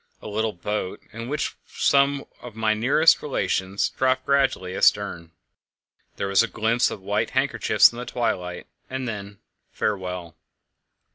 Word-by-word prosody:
A -, -, -10 dB
little 110 Hz, +1 st, -1 dB
boat, 95 Hz, +1 st, -4 dB
in 115 Hz, +2 st, -6 dB
which 150 Hz, +1 st, -1 dB
were -, -, -37 dB
some 140 Hz, 0 st, +2 dB, 0.2 s
of 120 Hz, -3 st, -10 dB
my 110 Hz, -1 st, +1 dB
nearest 135 Hz, +9 st, +4 dB
relations, 100 Hz, -8 st, -1 dB
dropped 130 Hz, 0 st, 0 dB
gradually 130 Hz, -10 st, +1 dB
astern. 90 Hz, -5 st, +2 dB, 0.9 s
There 100 Hz, -, -2 dB
was 100 Hz, +2 st, +4 dB
a 115 Hz, -, +1 dB
glimpse 115 Hz, +2 st, +1 dB
of 100 Hz, -, -7 dB
white 105 Hz, +2 st, 0 dB
handkerchiefs -, -, +4 dB
in 120 Hz, -, -9 dB
the 125 Hz, -, -5 dB
twilight, 90 Hz, -7 st, -2 dB, 0.2 s
and 130 Hz, -1 st, -4 dB
then 100 Hz, -2 st, -6 dB, 0.3 s
farewell! 90 Hz, -4 st, -3 dB
110 Hz, 145 wpm, -24 LUFS, 100-130 Hz, 0.9 s, nearest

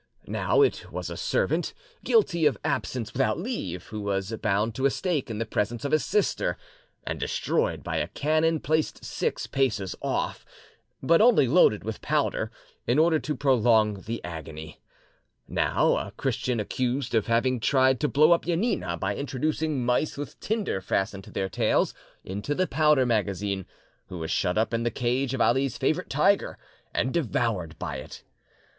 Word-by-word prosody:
Now -, -, +2 dB
it 415 Hz, -, -1 dB
was -, -, -5 dB
a -, -, -5 dB
servant, -, -, 0 dB, 0.3 s
guilty 170 Hz, -, +3 dB
of 135 Hz, -7 st, 0 dB
absence 120 Hz, -4 st, -2 dB
without 110 Hz, -, +1 dB
leave, 165 Hz, -, -4 dB
who 110 Hz, -1 st, -6 dB
was 100 Hz, +1 st, -2 dB
bound 105 Hz, +2 st, +1 dB
to 130 Hz, +3 st, +2 dB
a -, -, +2 dB
stake 165 Hz, -3 st, -1 dB
in 110 Hz, -, -4 dB
the 115 Hz, -, -1 dB
presence 110 Hz, +4 st, -2 dB
of 140 Hz, -, -1 dB
his 155 Hz, -, +3 dB
sister, 210 Hz, 0 st, 0 dB, 0.5 s
and -, -, -3 dB
destroyed -, -, -1 dB
by -, -, -2 dB
a -, -, 0 dB
cannon 155 Hz, +2 st, +1 dB
placed 155 Hz, 0 st, -1 dB
six -, -, -2 dB
paces 110 Hz, -9 st, -1 dB
off, -, -, -2 dB, 0.6 s
but 165 Hz, +7 st, +5 dB
only 225 Hz, -, +5 dB
loaded 120 Hz, -, +4 dB
with 110 Hz, -1 st, -5 dB
powder, -, -, 0 dB, 0.4 s
in 120 Hz, +4 st, +2 dB
order 160 Hz, 0 st, +4 dB
to 150 Hz, 0 st, -3 dB
prolong 110 Hz, -6 st, +3 dB
the 115 Hz, +1 st, -4 dB
agony; 80 Hz, -2 st, -8 dB, 0.7 s
now, -, -, +2 dB
a -, -, -4 dB
Christian 125 Hz, -3 st, -1 dB
accused 125 Hz, +5 st, -2 dB
of 110 Hz, -3 st, +2 dB
having 120 Hz, +2 st, +2 dB
tried 130 Hz, +1 st, +3 dB
to 150 Hz, -, +1 dB
blow 150 Hz, +3 st, +4 dB
up 170 Hz, -, +3 dB
Janina 165 Hz, -, 0 dB
by 95 Hz, +3 st, -2 dB
introducing 145 Hz, 0 st, -1 dB
mice 125 Hz, +5 st, +1 dB
with 145 Hz, -, -7 dB
tinder 210 Hz, -, -1 dB
fastened 95 Hz, +1 st, -2 dB
to -, -, -13 dB
their 95 Hz, -, -1 dB
tails 95 Hz, -, +1 dB, 0.3 s
into 100 Hz, +10 st, -3 dB
the 185 Hz, -, +2 dB
powder 150 Hz, -4 st, +3 dB
magazine, 100 Hz, -4 st, -1 dB, 0.4 s
who 90 Hz, -, -7 dB
was 80 Hz, -1 st, -4 dB
shut 90 Hz, +3 st, 0 dB
up 110 Hz, +2 st, +1 dB
in 115 Hz, -, +1 dB
the 120 Hz, -, +1 dB
cage 125 Hz, +3 st, -1 dB
of 130 Hz, -, -2 dB
Ali's 135 Hz, -2 st, +2 dB
favourite 155 Hz, +7 st, 0 dB
tiger 195 Hz, +8 st, +2 dB, 0.3 s
and 130 Hz, -, 0 dB
devoured 105 Hz, -, -1 dB
by -, -, -4 dB
it. -, -, -10 dB
125 Hz, 170 wpm, -26 LUFS, 105-155 Hz, 0.7 s, but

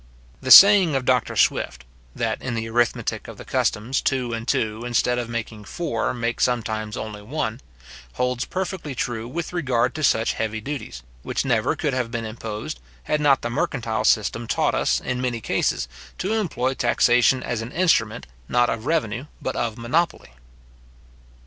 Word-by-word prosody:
The 130 Hz, -, -4 dB
saying 190 Hz, -, +9 dB
of 130 Hz, -1 st, -1 dB
Dr. 125 Hz, -2 st, +1 dB
Swift, -, -, +1 dB, 0.3 s
that -, -, -2 dB
in 125 Hz, -2 st, -3 dB
the 115 Hz, 0 st, -3 dB
arithmetic 120 Hz, 0 st, 0 dB
of -, -, -10 dB
the -, -, -10 dB
customs, 115 Hz, +6 st, 0 dB
two 125 Hz, -3 st, -1 dB
and 115 Hz, +1 st, -5 dB
two, 110 Hz, -1 st, 0 dB
instead 120 Hz, 0 st, +1 dB
of 120 Hz, -1 st, -4 dB
making 110 Hz, -2 st, -5 dB
four, 115 Hz, -7 st, -2 dB
make 120 Hz, -1 st, -3 dB
sometimes 110 Hz, -3 st, -1 dB
only 105 Hz, -1 st, -6 dB
one, 120 Hz, 0 st, -3 dB, 0.5 s
holds 125 Hz, -, -1 dB
perfectly 185 Hz, -6 st, -4 dB
true 120 Hz, -2 st, -3 dB
with 165 Hz, +7 st, -5 dB
regard 130 Hz, -7 st, +1 dB
to 155 Hz, -, -5 dB
such 115 Hz, -4 st, +2 dB
heavy 110 Hz, 0 st, -3 dB
duties, 120 Hz, -, -6 dB, 0.2 s
which -, -, -2 dB
never -, -, +1 dB
could -, -, -1 dB
have 125 Hz, -2 st, -1 dB
been 115 Hz, -1 st, -4 dB
imposed, 110 Hz, -, -6 dB, 0.2 s
had 150 Hz, 0 st, 0 dB
not 140 Hz, -3 st, +4 dB
the 120 Hz, -, -2 dB
mercantile 115 Hz, -3 st, -1 dB
system 110 Hz, +2 st, +1 dB
taught -, -, +1 dB
us, -, -, +1 dB
in 125 Hz, 0 st, -3 dB
many 125 Hz, -2 st, -1 dB
cases, -, -, 0 dB, 0.3 s
to 195 Hz, +4 st, -1 dB
employ 140 Hz, -, 0 dB
taxation 125 Hz, 0 st, +3 dB
as 115 Hz, -2 st, -2 dB
an 115 Hz, +2 st, -7 dB
instrument, 180 Hz, -1 st, +1 dB, 0.2 s
not 120 Hz, 0 st, +3 dB
of 115 Hz, +2 st, -4 dB
revenue, 140 Hz, -5 st, -1 dB
but 130 Hz, -, -3 dB
of 115 Hz, -2 st, -2 dB
monopoly. 150 Hz, -, -1 dB
120 Hz, 170 wpm, -23 LUFS, 115-135 Hz, 0.5 s, saying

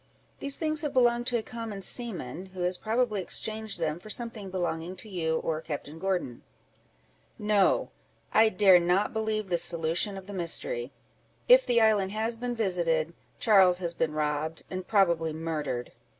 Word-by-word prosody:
These 280 Hz, 0 st, -3 dB
things 310 Hz, -2 st, -1 dB
have 295 Hz, -3 st, -3 dB
belonged 240 Hz, -2 st, +3 dB
to 245 Hz, -, +1 dB
a 225 Hz, -, -3 dB
common 225 Hz, -4 st, -6 dB
seaman, 185 Hz, -, -2 dB
who 185 Hz, -, -5 dB
has 180 Hz, +1 st, 0 dB
probably 220 Hz, -2 st, 0 dB
exchanged 220 Hz, +2 st, -3 dB
them 160 Hz, -1 st, -2 dB
for 215 Hz, -, -12 dB
something 225 Hz, -3 st, -4 dB
belonging 175 Hz, -1 st, -3 dB
to 200 Hz, -, -7 dB
you 165 Hz, -5 st, -1 dB
or 160 Hz, -1 st, -2 dB
Captain 155 Hz, 0 st, -6 dB
Gordon." 180 Hz, -10 st, -2 dB, 1.0 s
"No! 210 Hz, -2 st, +2 dB, 0.4 s
I 220 Hz, 0 st, +6 dB
dare 190 Hz, -3 st, +6 dB
not 180 Hz, +7 st, +1 dB
believe 220 Hz, -1 st, -1 dB
this 175 Hz, -1 st, +3 dB
solution 170 Hz, +4 st, 0 dB
of 190 Hz, -, -9 dB
the 205 Hz, -, -9 dB
mystery: 195 Hz, -, -2 dB, 0.6 s
if -, -, +7 dB
the 240 Hz, -1 st, +4 dB
island 205 Hz, -3 st, +3 dB
has 220 Hz, +2 st, -1 dB
been 245 Hz, +1 st, -4 dB
visited, 170 Hz, -6 st, 0 dB, 0.3 s
Charles 190 Hz, -5 st, +5 dB
has 170 Hz, -2 st, -3 dB
been 160 Hz, -2 st, -1 dB
robbed, 155 Hz, +1 st, -2 dB
and 185 Hz, 0 st, -5 dB
probably 170 Hz, -6 st, +2 dB
murdered." 155 Hz, -6 st, -3 dB
190 Hz, 165 wpm, -28 LUFS, 165-220 Hz, 1.0 s, if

